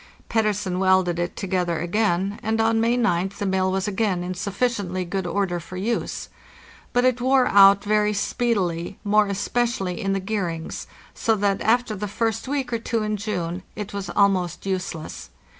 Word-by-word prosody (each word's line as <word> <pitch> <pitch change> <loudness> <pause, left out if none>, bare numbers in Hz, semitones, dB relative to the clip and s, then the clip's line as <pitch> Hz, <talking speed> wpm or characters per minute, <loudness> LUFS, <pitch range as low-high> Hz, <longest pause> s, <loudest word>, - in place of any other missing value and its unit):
Pettersen 210 -5 0
welded 185 -2 +3
it 175 0 -2
together 180 -3 -1
again, 195 +2 0
and 220 +1 -1
on 225 0 +3
May 235 +2 +2
oth 190 -4 0
the 205 - -2
mill 190 -1 +1
was 190 +1 -1
again 195 -3 0
in 180 +1 -3
sufficiently 195 -1 -1
good 190 +1 -3
order 185 -2 -1
for 180 +2 -9
use. 225 +5 -2 0.6
But 245 +1 +2
it 250 -1 +2
wore 260 0 +4
out 200 -1 +7
very 210 0 +2
speedily, 200 -5 -1
more 210 0 +3
especially 205 -1 -1
in 195 -2 0
the 195 - 0
gearings, 185 -5 -3 0.3
so 225 - +1
that, 200 -1 0
after 230 0 +2
the 210 +2 -4
first 225 +3 -2
week 265 -3 -2
or 230 - 0
two 225 -1 -1
in 215 0 -1
June, 185 -4 -3
it 210 -1 -6
was 200 -2 -4
almost 185 -3 +1
useless. 185 -4 -4
200 Hz, 170 wpm, -23 LUFS, 185-220 Hz, 0.6 s, out